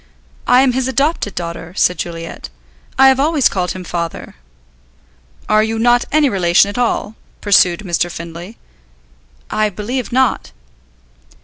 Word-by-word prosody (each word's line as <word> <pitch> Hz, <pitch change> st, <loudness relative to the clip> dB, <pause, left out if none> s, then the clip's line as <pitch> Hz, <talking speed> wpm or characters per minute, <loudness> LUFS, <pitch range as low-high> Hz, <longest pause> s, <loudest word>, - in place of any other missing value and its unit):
"I 250 Hz, +1 st, +5 dB
am 265 Hz, -, +3 dB
his 260 Hz, 0 st, -1 dB
adopted 275 Hz, -4 st, -1 dB
daughter," 170 Hz, 0 st, -6 dB
said 180 Hz, -, +2 dB
Juliet. 165 Hz, -1 st, -6 dB, 0.5 s
"I 270 Hz, -, +7 dB
have 265 Hz, 0 st, +2 dB
always 295 Hz, -2 st, +3 dB
called 180 Hz, -2 st, -2 dB
him 185 Hz, -, -8 dB
'Father.'" 170 Hz, -2 st, -5 dB, 1.1 s
"Are 215 Hz, 0 st, +3 dB
you 220 Hz, +1 st, -1 dB
not 240 Hz, +2 st, +3 dB
any 305 Hz, -1 st, +3 dB
relation 185 Hz, -3 st, +3 dB
at 205 Hz, -, -7 dB
all?" 225 Hz, -3 st, -1 dB, 0.2 s
pursued 190 Hz, -3 st, +3 dB
Mr. 175 Hz, -3 st, -1 dB
Findlay. 170 Hz, +5 st, -9 dB, 0.9 s
"I 215 Hz, 0 st, +1 dB
believe 225 Hz, +6 st, -4 dB
not." 260 Hz, -1 st, 0 dB
210 Hz, 135 wpm, -16 LUFS, 175-255 Hz, 1.1 s, I